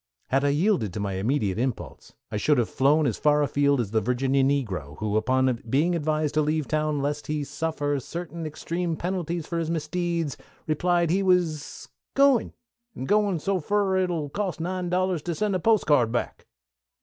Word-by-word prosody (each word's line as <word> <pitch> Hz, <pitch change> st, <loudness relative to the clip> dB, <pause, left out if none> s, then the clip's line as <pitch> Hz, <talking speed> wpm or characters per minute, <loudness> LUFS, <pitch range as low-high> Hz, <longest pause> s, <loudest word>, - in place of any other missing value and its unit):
Had 135 Hz, +3 st, +2 dB
I 145 Hz, -, +3 dB
yielded 145 Hz, -, +1 dB
to -, -, -4 dB
my 100 Hz, -1 st, -2 dB
immediate 105 Hz, 0 st, 0 dB
impulse, 130 Hz, -1 st, -4 dB, 0.2 s
I -, -, -1 dB
should 145 Hz, +7 st, +2 dB
have 120 Hz, -3 st, 0 dB
flown 145 Hz, +4 st, +3 dB
as 120 Hz, -7 st, -1 dB
far 150 Hz, 0 st, +3 dB
afield 140 Hz, -1 st, +2 dB
as 110 Hz, -5 st, -2 dB
the 110 Hz, 0 st, +2 dB
Virginia 130 Hz, +4 st, +1 dB
negro 100 Hz, -, -1 dB
who, 105 Hz, -1 st, -2 dB
upon 130 Hz, +2 st, +1 dB
being 155 Hz, +8 st, +2 dB
advised 155 Hz, -2 st, 0 dB
to 155 Hz, -, +3 dB
leave 155 Hz, -1 st, 0 dB
town 155 Hz, -2 st, 0 dB
lest 145 Hz, +1 st, -2 dB
he 150 Hz, -1 st, -1 dB
suffer 145 Hz, -1 st, -2 dB
certain 170 Hz, +3 st, -6 dB
extreme 170 Hz, +2 st, -3 dB
penalties 175 Hz, -2 st, -3 dB
for 170 Hz, 0 st, -3 dB
his 165 Hz, -1 st, -2 dB
misdeeds, 165 Hz, -1 st, -2 dB, 0.3 s
replied 170 Hz, +2 st, +1 dB
that -, -, +2 dB
he 195 Hz, -, +2 dB
was 175 Hz, -5 st, 0 dB, 0.3 s
"gwine, 275 Hz, -3 st, +4 dB, 0.4 s
an' 130 Hz, -, -5 dB
gwine 205 Hz, 0 st, +2 dB
so 195 Hz, +4 st, -1 dB
fur 200 Hz, +3 st, +1 dB
it'll 175 Hz, -6 st, -1 dB
cost 195 Hz, +2 st, -3 dB
nine 180 Hz, +1 st, -2 dB
dollars 180 Hz, -2 st, 0 dB
to 170 Hz, +1 st, -3 dB
send 210 Hz, +3 st, 0 dB
a -, -, +1 dB
postal 215 Hz, -6 st, +3 dB
card 120 Hz, -4 st, +2 dB
back." 120 Hz, -, -3 dB
155 Hz, 185 wpm, -26 LUFS, 135-175 Hz, 0.4 s, gwine